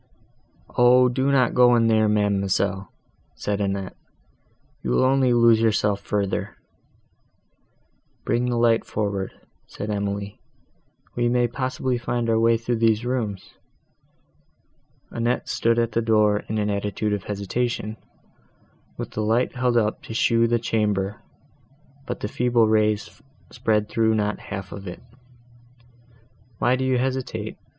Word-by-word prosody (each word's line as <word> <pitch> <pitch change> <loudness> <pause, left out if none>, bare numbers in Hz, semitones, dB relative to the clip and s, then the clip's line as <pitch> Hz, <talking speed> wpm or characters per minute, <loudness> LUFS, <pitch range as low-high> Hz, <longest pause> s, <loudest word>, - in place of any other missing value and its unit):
"O! 125 +1 +6
do 130 +3 0
not 130 -3 +3
go 125 -1 +5
in 115 -1 +3
there, 110 -1 +3
ma'amselle," 100 -2 0 0.4
said 105 0 -2
Annette, 100 -1 -3 0.9
"you 65 - -4
will 60 - +2
only 130 -1 +3
lose 115 -2 +5
yourself 105 -2 +1
further." 100 -1 -2 1.7
"Bring 125 +1 0
the 120 - -1
light 115 -1 +3
forward," 100 -2 -3 0.4
said 105 +1 -6
Emily, 100 0 -3 0.8
"we 120 0 +1
may 120 0 +2
possibly 130 0 -2
find 120 -1 -1
our 110 - +2
way 115 0 +4
through 115 +1 -2
these 110 0 +2
rooms." 110 -7 -3 1.6
Annette 120 +2 -1
stood 115 0 +1
at 115 -1 +1
the 115 - 0
door, 105 -2 +3
in 110 - -2
an 105 -1 0
attitude 105 +1 -2
of 100 -2 -4
hesitation, 110 +2 -3 1.0
with - - -6
the 110 - -3
light 115 +4 +1
held 125 -1 +1
up 110 -2 0
to 110 - -8
show 115 0 +3
the 120 0 +2
chamber, 105 -2 -1 0.9
but - - -5
the - - -2
feeble 120 0 +2
rays 110 -1 0 0.3
spread 110 -4 0
through 110 0 +1
not 105 -1 -1
half 95 -3 -6
of 100 -1 -8
it. 90 +5 -8 1.5
"Why 125 +4 +2
do 130 - -2
you 130 -1 +1
hesitate?" 130 0 -3
110 Hz, 135 wpm, -23 LUFS, 105-120 Hz, 1.7 s, O